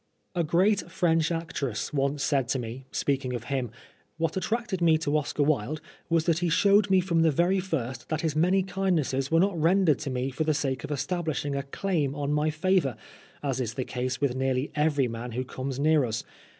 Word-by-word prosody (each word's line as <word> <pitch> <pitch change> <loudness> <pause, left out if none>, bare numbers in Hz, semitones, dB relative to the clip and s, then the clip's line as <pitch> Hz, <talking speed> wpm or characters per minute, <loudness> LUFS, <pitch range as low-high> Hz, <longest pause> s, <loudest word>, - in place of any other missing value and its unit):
A 175 -2 +1
great 180 +4 +2
French 165 -2 +1
actress 155 -8 -3
once 140 0 0
said 135 -3 +1
to - - 0
me, 125 +2 -6
speaking 135 -3 -1
of 120 - -5
him, 130 -3 -1 0.2
" - - -37
What 165 0 -1
attracted 220 -1 -2
me 165 -2 +5
to 155 -2 -1
Oscar 150 -1 0
Wilde 145 0 0 0.3
was 165 -1 +3
that 165 -2 +2
he 175 -1 0
showed 200 +4 +4
me 190 -1 +5
from 170 -2 +1
the 165 - +5
very 175 +6 +2
first 130 -10 -4
that 155 -1 -1
his 160 -3 -1
many 180 +4 +3
kindnesses 170 -9 0
were 165 - +4
not 195 +1 +2
rendered 170 -3 +4
to 155 - -4
me 130 +1 -2
for 145 +5 -1
the 155 -1 +1
sake 135 -2 -1
of - - -5
establishing 145 0 -2
a 140 - 0
claim 145 0 -1
on 145 0 -1
my 150 +1 +2
favour, 155 - +1 0.5
as 135 -2 -1
is 115 -2 -3
the 130 - -2
case 125 0 -3
with 140 -3 +1
nearly 130 +1 -1
every 150 -3 +2
man 115 +1 -6
who 125 +2 -1
comes 130 +1 -5
near 155 0 +4
us. 115 0 -3
150 Hz, 210 wpm, -27 LUFS, 135-170 Hz, 0.5 s, me